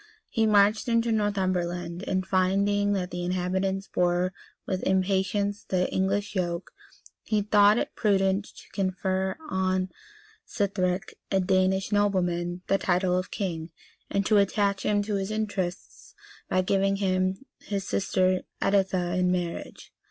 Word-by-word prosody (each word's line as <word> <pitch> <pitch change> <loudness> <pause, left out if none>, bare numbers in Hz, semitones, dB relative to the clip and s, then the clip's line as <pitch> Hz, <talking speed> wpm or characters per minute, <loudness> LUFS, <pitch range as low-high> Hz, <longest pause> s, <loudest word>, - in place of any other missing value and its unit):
He 225 -3 +1
marched 210 +1 +4
into 230 0 +2
Northumberland; 185 -4 -1
and, 185 -1 0
finding 200 +2 +2
that 185 -2 -2
the 175 0 -4
inhabitants 185 +2 -1
bore 180 +1 +1 0.3
with 185 -1 -2
impatience 195 +2 0
the 180 -1 0
English 195 +2 0
yoke, 175 -2 -2 0.5
he 210 -2 0
thought 210 +1 +5
it - - -2
prudent 195 -1 +2
to - - -15
confer 190 0 -1
on 185 0 0 0.5
Sithric, 190 -2 -1 0.2
a 195 - +2
Danish 190 +1 +1
nobleman, 180 -3 0
the 195 - +1
title 180 0 +1
of 185 0 -1
king, 170 -5 -3 0.4
and 200 0 0
to 215 - +4
attach 200 0 +1
him 205 -1 +1
to 205 -1 -1
his 195 0 -3
interests 205 -4 -4 0.3
by 185 0 +2
giving 195 +1 +2
him 185 +2 0 0.2
his 195 -2 -4
sister 185 -1 +1 0.2
Editha 190 -3 +1
in 180 0 +2
marriage. 175 -2 -4
190 Hz, 135 wpm, -27 LUFS, 185-200 Hz, 0.5 s, thought